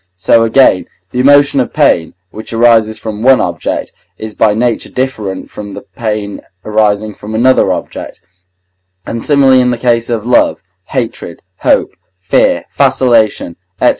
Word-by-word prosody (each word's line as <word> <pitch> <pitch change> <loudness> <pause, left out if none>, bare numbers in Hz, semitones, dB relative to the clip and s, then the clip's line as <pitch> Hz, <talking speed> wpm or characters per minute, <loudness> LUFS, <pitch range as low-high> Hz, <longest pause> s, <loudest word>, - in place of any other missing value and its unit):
So 95 +5 +2
again 115 -4 +3 0.2
the 125 - -3
emotion 140 +1 +4
of 125 - -1
pain, 140 - +1 0.2
which 110 +2 -8
arises 115 -2 +3
from 110 -1 -6
one 130 +1 +4
object, 85 -5 -3 0.2
is 110 -1 -7
by 105 -1 +2
nature 120 0 -1
different 110 -7 -4
from 100 -1 -8
the 100 - -9
pain 105 -3 -5 0.2
arising 105 0 0
from 105 +2 -8
another 130 +3 +3
object, - - -6 0.9
and, 115 0 -5
similarly, 135 -3 +4
in 125 - +1
the 120 - -1
case 115 -1 0
of 115 -2 -2
love, 125 -5 +2 0.2
hatred, 115 -9 -5
hope, - - +1 0.3
fear, 90 - +1
vacillation, 110 -8 +1 0.2
&c. - - +4
115 Hz, 145 wpm, -12 LUFS, 105-125 Hz, 0.9 s, emotion